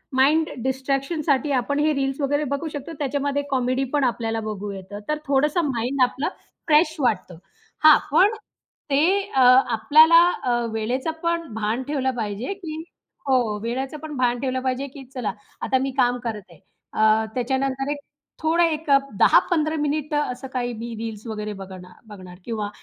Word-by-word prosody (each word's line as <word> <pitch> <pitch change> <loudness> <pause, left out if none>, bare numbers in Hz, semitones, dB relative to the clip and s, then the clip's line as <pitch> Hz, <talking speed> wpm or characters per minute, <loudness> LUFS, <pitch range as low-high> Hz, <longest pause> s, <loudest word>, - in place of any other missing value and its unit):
Mind 300 +5 +3
डिस्ट्रॅक्शनसाठी 275 +2 0
आपण 285 +4 -1
हे 305 +1 +2
reels 270 0 -1
वगैरे 290 +2 +1
बघू 290 +3 -3
शकतो. 290 +2 -7
त्याच्यामध्ये 285 0 -1
कॉमेडीपण 265 +2 0
आपल्याला 225 -2 -1
बघू 205 -1 -4
येतं. 195 +1 -8
तर 300 - +1
थोडंसं 290 +5 +2
माइंड 260 0 -1
आपलं 260 +3 0 0.4
फ्रेश 310 +1 +4
वाटतं. 205 - -1 0.5
हां. 310 -1 +9
पण 390 +8 +5 0.6
ते 275 +1 +4 0.3
अ, 265 - +4 0.3
आपल्याला 315 +8 +7 0.2
अ, 250 - 0 0.2
वेळेचं 245 +8 -1
पण 335 0 0
भान 225 +3 -2
ठेवलं 270 -3 0
पाहिजे 215 - -3
की 320 -5 -7 0.4
हो. 245 -6 +2
वेळेचं 260 +5 -3
पण 300 -2 -7
भान 245 -1 +1
ठेवलं 260 0 -1
पाहिजे 260 +1 -2
की 275 - -9
चला 245 -5 -2 0.3
आता 260 - +1
मी 270 - -1
काम 245 -1 +3
करत 220 -3 -3
आहे. 165 - -17 0.3
अ, 220 0 +3
त्याच्यानंतर 265 +2 -1
एक 295 - -2 0.5
थोडं 330 +2 +3
एक 315 -2 -1
अ, 275 - +8 0.2
10-15 315 -3 +4
मिनिटं 295 0 -1
असं 250 +2 -7
काही 245 -1 -2
मी 230 +1 -6
रील्स 225 -1 -6
वगैरे 210 -1 -4
बघणार 185 -1 -12
बघणार 185 -4 -11
किंवा 215 -3 -3
265 Hz, 160 wpm, -23 LUFS, 230-295 Hz, 0.6 s, हां